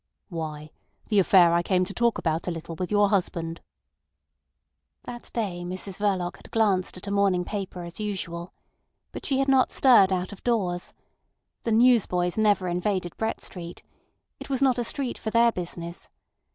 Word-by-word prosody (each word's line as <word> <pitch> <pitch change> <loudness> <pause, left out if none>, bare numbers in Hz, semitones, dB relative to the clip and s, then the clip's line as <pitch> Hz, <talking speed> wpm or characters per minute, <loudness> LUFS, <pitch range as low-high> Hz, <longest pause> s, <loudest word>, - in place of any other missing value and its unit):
"Why, 155 -3 -6 0.4
the 210 -3 +4
affair 180 -2 +6
I 170 - +3
came 185 +1 +1
to 200 - -8
talk 235 +1 +1
about 160 +2 -1
a - - 0
little 165 0 -6
with 180 +2 -4
your 205 -1 +3
husband." 170 -4 -1 1.4
That 240 -1 -9
day 195 -7 -2
Mrs 185 +2 -6
Verloc 190 -4 0
had - - -15
glanced 200 -5 +1
at 180 - -9
a 200 - -4
morning 195 -3 +2
paper 190 -3 -5
as 170 +3 -9
usual. 180 -4 -4 0.6
But - - -5
she 270 - +1
had 275 0 +1
not 265 -2 +4
stirred 230 -8 +6
out 185 +1 -1
of 195 - -14
doors. 185 -7 -1 0.7
The 230 - 0
newsboys 220 -7 +3
never 205 -4 +2
invaded 180 0 -1
Brett 220 0 -2
Street. 175 -2 -7 0.6
It - - -9
was 265 -2 0
not 260 -3 +3
a - - 0
street 255 +1 -3
for 220 - -3
their 235 +1 +4
business. 170 -2 -7
190 Hz, 170 wpm, -26 LUFS, 175-220 Hz, 1.4 s, affair